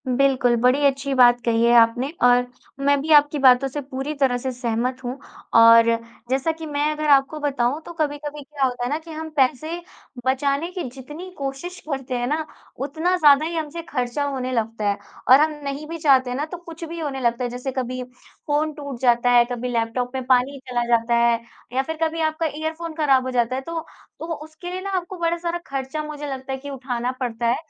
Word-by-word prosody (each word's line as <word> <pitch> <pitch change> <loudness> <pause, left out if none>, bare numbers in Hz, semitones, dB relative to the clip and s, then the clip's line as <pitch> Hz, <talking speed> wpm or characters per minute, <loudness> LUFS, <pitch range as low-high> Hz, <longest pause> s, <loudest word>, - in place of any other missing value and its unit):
बिल्कुल, 255 -1 +3
बड़ी 250 +4 +3
अच्छी 275 0 +1
बात 245 -2 +5
कही 230 -1 +2
है 235 - +4
आपने 230 +4 +2
और 245 0 +5 0.4
मैं 285 0 +4
भी 315 +3 -3
आपकी 295 0 +5
बातों 260 0 +6
से 290 +2 -5
पूरी 270 +2 -5
तरह 255 -2 +3
से 260 +2 -3
सहमत 250 +1 -2
हूँ 250 +2 -4 0.4
और 230 0 +8 0.4
जैसा 270 +5 +1
कि 320 0 -8
मैं 295 0 0
अगर 305 0 -2
आपको 280 +2 +4
बताऊँ 280 0 0
तो 345 - -8
कभी-कभी 295 -2 -3
क्या 285 -1 -4
होता 245 -1 -2
है 245 - -1
ना 295 - 0
कि 325 0 -12
हम 315 0 -6
पैसे 310 +5 +1 0.4
बचाने 280 +4 +1
की 365 -1 -4
जितनी 295 +8 -9
कोशिश 275 +6 -5
करते 265 -3 -3
हैं 245 0 -1
ना, 310 +3 -1 0.3
उतना 315 +7 0
ज़्यादा 295 -2 +6
ही 335 +1 -3
हमसे 320 +1 -4
ख़र्चा 250 +1 -1
होने 265 -3 -2
लगता 225 -3 -1
है 200 - 0 0.3
और 260 +2 +9
हम 310 +1 +3
नहीं 280 +2 -5
भी 330 +1 -5
चाहते 270 -5 +4
है 245 - -3
ना 295 - -1
तो 335 +3 -7
कुछ 335 -1 -10
भी 335 +1 -7
होने 285 -4 -3
लगता 235 0 0
है। 245 - -1
जैसे 250 +2 -4
कभी 255 -1 -3 0.5
फ़ोन 305 +1 +1
टूट 280 -4 -7
जाता 245 -1 +3
है, 240 -1 +6
कभी 245 +1 -3
लैपटॉप 240 +1 -1
में 260 - -2
पानी 255 +1 +3
ही 280 - -10
चला 240 -1 0
जाता 230 +1 +1
है 235 0 +3 0.3
या 260 - +2
फिर 320 +3 -5
कभी 325 0 -1
आपका 315 +1 0
इयरफ़ोन 320 +2 -4
ख़राब 275 -5 +3
हो 260 - -2
जाता 245 0 +1
है। 265 - -2
तो, 330 +3 -5 0.3
तो 325 - -6
वो 335 - -2
उसके 315 +3 -9
लिए 370 +1 -4
ना 395 - -5
आपको 360 +1 -5
बड़ा 335 0 +1
सारा 340 0 -2
ख़र्चा 275 +3 -4
मुझे 300 -1 -6
लगता 270 -1 -5
है - - -2
कि 285 +2 -8
उठाना 250 -2 -3
पड़ता 240 -2 -3
है, 235 - +3
275 Hz, 220 wpm, -22 LUFS, 250-310 Hz, 0.5 s, और